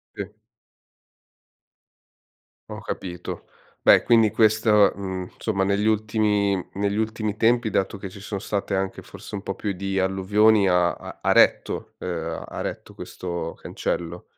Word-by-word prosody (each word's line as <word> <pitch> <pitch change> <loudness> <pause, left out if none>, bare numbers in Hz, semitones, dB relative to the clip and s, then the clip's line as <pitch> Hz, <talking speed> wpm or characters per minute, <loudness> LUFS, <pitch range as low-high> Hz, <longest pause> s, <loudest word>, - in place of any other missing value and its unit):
Sì. 100 -1 -6 2.4
Ho - - -7
capito. 90 -2 -6 0.4
Beh, - - +6
quindi 115 -2 +5
questo, 110 -1 +4
mhmm, 95 -2 -5
insomma 100 -4 -1
negli 100 +1 +1
ultimi 105 -2 +2 0.2
negli 100 +1 -1
ultimi 110 -1 -2
tempi, 120 +1 +3
dato 100 +1 -1
che 95 - -6
ci 95 +2 -12
son 100 0 -5
state 100 -1 -2
anche 95 0 -3
forse - - -11
un 100 - -4
po' 95 - -4
più 105 - -2
di 95 +1 -3
alluvioni, 100 +2 +3
ha 90 -1 +3
ha - - -10
ha - - +2
retto, - - +2
ehm, 85 -2 -4
ha - - -7
retto - - -6
questo 85 -2 -5
cancello? 85 +1 -4
100 Hz, 140 wpm, -24 LUFS, 95-105 Hz, 2.4 s, Beh